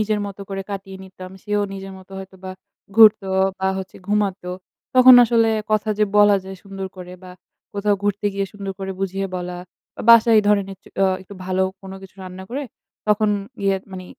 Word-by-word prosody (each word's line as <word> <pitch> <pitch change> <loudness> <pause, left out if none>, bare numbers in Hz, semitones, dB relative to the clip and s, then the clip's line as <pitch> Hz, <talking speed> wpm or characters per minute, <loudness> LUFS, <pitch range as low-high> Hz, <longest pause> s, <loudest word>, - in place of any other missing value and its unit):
নিজের 215 -1 0
মতো 200 0 -9
করে 195 0 -4
কাটিয়ে 195 -1 -6
নিতাম। 185 -1 -11
সেও 210 -1 0
নিজের 195 0 -8
মতো 190 +1 -16
হয়তো 190 0 -10
বা 185 - -5 0.5
ঘুরত 215 -2 +8 0.4
বা 190 - +1
হচ্ছে 190 -1 -8
ঘুমাতো। 200 -3 -1 0.4
তখন 255 0 +9
আসলে 230 -1 +3 0.2
কথা 215 0 +1
যে 210 - +4
বলা 205 -1 +6
যায় 190 0 -8
সুন্দর 195 -1 -6
করে, 180 0 -9
বা 185 - -11 0.4
কোথাও 205 0 +1
ঘুরতে 205 0 -1
গিয়ে 195 0 -1
সুন্দর 200 -1 -6
করে 190 0 -5
বুঝিয়ে 195 0 -2
বলা, 180 0 -5 0.4
বা - - -6
বাসায়ই 230 -1 +7
ধরনের 200 -2 +2
একচু 190 - -21
অ্যা 195 - +4 0.2
একটু 200 +2 -12
ভালো 185 0 0 0.2
কোনো 190 0 -9
কিছু 190 - -13
রান্না 185 0 -9
করে, 275 +4 -3 0.5
তখন 210 0 +3 0.3
গিয়ে 195 -1 +2 0.2
মানে 185 -1 -7
195 Hz, 185 wpm, -21 LUFS, 190-210 Hz, 0.5 s, তখন